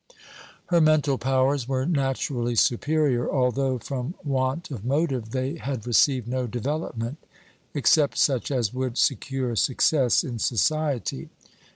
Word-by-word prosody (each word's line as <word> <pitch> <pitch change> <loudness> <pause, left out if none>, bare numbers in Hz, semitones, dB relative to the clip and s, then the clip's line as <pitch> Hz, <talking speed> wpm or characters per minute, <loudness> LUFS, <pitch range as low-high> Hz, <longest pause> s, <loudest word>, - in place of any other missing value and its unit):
Her 170 -2 +4
mental 150 -3 +3
powers 130 0 +1
were 130 -1 -1
naturally 135 -5 -1
superior, 135 +1 +1
although, 130 0 +1
from 135 +6 -5
want 135 +3 -1
of 115 -7 -6
motive, 135 -3 -1
they 130 +6 -3
had 130 -7 -5
received 125 0 +2
no 125 0 -2
development, 120 +1 -4 0.6
except 145 +2 +3
such 130 -4 +1
as 125 -6 -1
would 130 -1 -3
secure 130 -2 0
success 130 +3 +2
in 120 -7 -5
society. 145 +4 -1
130 Hz, 125 wpm, -25 LUFS, 125-145 Hz, 0.6 s, Her